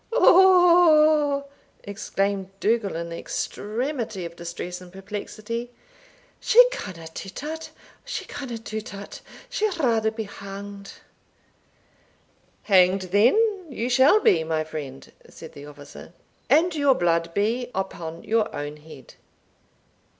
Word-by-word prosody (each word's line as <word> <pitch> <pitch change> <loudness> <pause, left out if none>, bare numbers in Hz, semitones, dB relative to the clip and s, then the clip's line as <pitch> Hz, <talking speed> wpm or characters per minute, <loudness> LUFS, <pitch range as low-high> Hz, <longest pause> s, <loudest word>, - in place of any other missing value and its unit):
oigh!" 340 - +5 0.4
exclaimed 195 -1 -2
Dougal, 220 -3 0
in 170 +1 -4
the 170 - -6
extremity 220 - -4
of 170 0 -8
distress 175 +1 -6
and 180 -1 -13
perplexity; 210 +4 -6 0.7
"she - - +6
canna 185 - -7
do 195 - -7
tat 315 - -6 0.3
she - - -5
canna 245 -4 -6
do 220 -1 -6
tat; 205 -2 -10 0.3
she'll 420 -4 -1
rather 230 -7 +2
be 220 0 -5
hanged." 200 0 -9 1.7
"Hanged, 185 -1 +3
then, 205 - +5 0.3
you 250 -2 -3
shall 265 - +5
be, 165 - +3
my 160 -1 -1
friend" 145 -4 -8 0.2
said 160 - -12
the 145 0 -11
officer; 145 +3 -12 0.4
"and 320 +6 +4
your 285 -3 +3
blood 170 -2 +1
be 230 +5 0
upon 170 -4 -5
your 225 -1 0
own 145 +1 -5
head. 150 -5 -14
205 Hz, 120 wpm, -24 LUFS, 175-265 Hz, 1.7 s, she